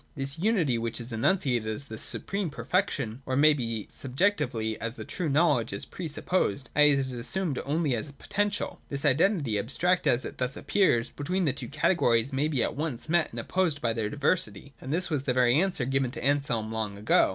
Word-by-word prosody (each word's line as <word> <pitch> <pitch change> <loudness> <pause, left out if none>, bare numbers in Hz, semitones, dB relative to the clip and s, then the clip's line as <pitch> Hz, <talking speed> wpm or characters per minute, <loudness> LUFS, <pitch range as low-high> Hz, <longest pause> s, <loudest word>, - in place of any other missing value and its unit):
This 135 +2 -3
unity 170 - +2
which 115 0 -3
is 120 +1 -6
enunciated 120 - +1
as 125 +6 -4
the 110 -4 -8
supreme 195 -3 -1
perfec 185 +6 0
tion 115 +3 -4
or, 130 - -2
it - - 0
may 155 +2 +6
be, 115 -6 -3
subjectively, 130 - -1
as 115 +1 -3
the - - -7
true 175 -4 -3
knowledge, 145 -6 +2
is 100 - -3
pre 180 - -6
supposed, 145 - -1
i.e. 150 0 +7
it 145 - +4
is 130 -1 -1
assumed 140 +5 -1
only 145 -2 0
as 140 +6 -5
potential. 205 +7 -2
This 140 +1 -1
identity, 145 - +2
abstract 170 - +1
as 120 +1 +2
it - - -8
thus 125 +1 -1
appears, 125 - +2
between 180 +6 -1
the 140 - +2
two - - -6
categories 140 -5 +2
maybe 140 -1 +1
at - - -1
once 145 -2 -4
met 170 -1 +2
and - - -6
opposed 180 -6 0
by 115 -4 0
their 110 -2 -2
diversity; 140 - -1
and 130 - -6
this 175 +2 0
was 140 -3 -1
the 125 - +1
very 125 -1 +4
answer 185 -10 0
given 135 0 0
to - - -7
Anselm 140 -6 0
long 110 -3 -3
ago. 105 +2 +3
140 Hz, 210 wpm, -28 LUFS, 120-160 Hz, -, i.e